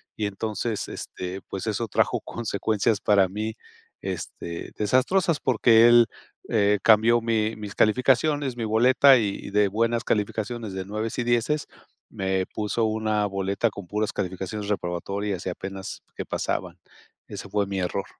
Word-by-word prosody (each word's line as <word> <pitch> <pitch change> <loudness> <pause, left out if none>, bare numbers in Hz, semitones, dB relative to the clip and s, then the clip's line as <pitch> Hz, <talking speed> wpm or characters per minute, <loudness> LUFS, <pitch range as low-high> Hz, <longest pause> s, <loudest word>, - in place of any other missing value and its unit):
y 105 - -1
entonces, 105 +2 -3
este, 90 +1 -6
pues, 95 - -5
eso 110 +2 -1
trajo - - +1
consecuencias 110 -1 -1
para 100 -2 +4
mí, 110 +4 -4 0.5
este, 85 -2 -6
desastrosas 145 - +2
porque 115 -1 +5
él, 120 0 +7 0.4
eh, 105 -2 +3
cambió 115 +2 +5
mi 115 -1 0
mis 105 -1 -7
calificaciones, 130 +4 +2
mi 115 - -3
boleta 130 +5 +6
y 100 -4 -1
y - - -5
de 105 0 +3
buenas 115 +3 0
calificaciones 110 +1 -2
de 95 0 -4
9 110 +3 -4
y 120 - 0
10 120 +5 0 0.4
me 95 -1 -1
puso 105 +3 -2
una 110 -1 0
boleta 100 +3 -1
con 100 -3 -9
puras 105 +3 -2
calificaciones 95 +2 -4
reprobatorias 100 +1 -3
y - - +1
apenas 95 +1 -7
que - - -5
pasaban. - - -3 0.5
Ese - - -8
fue 105 -1 +1
mi 100 -1 -3
error. 95 +2 -2
105 Hz, 150 wpm, -25 LUFS, 100-115 Hz, 0.5 s, él